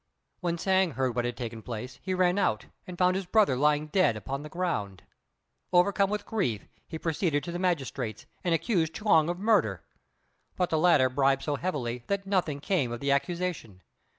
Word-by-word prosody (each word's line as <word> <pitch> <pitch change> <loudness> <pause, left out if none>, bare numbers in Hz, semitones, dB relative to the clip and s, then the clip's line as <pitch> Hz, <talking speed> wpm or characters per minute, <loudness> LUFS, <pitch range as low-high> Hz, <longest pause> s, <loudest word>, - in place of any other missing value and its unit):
When 170 -1 -1
Hsiang 190 -1 +2
heard 130 -3 -1
what 120 -1 0
had 120 -1 -3
taken 115 -2 -5
place 120 +3 -7
he 185 -1 -2
ran 180 +1 +2
out 110 - 0 0.2
and 180 -1 -8
found 180 0 +3
his 190 -1 -3
brother 205 - +3
lying 150 +3 +2
dead 155 - +2
upon 135 +6 -5
the 150 - -8
ground. 105 - -3 0.7
Overcome 195 +2 +3
with 210 0 -3
grief, 125 - -2 0.2
he 160 - -5
proceeded 160 -2 0
to 170 - -5
the 175 - -4
magistrate's, 135 - -2 0.2
and 175 -2 +2
accused 165 -4 0
Chuang 165 -7 +3
of 175 - -2
murder; 180 - +2 0.7
but 180 -1 0
the 160 - +2
latter 155 -6 +5
bribed 135 +1 +1
so 145 - -1
heavily 125 -8 -3
that 200 0 -1
nothing 180 -7 0
came 145 - 0
of 120 - -4
the 140 +2 0
accusation. 145 - -2
160 Hz, 185 wpm, -28 LUFS, 130-185 Hz, 0.7 s, latter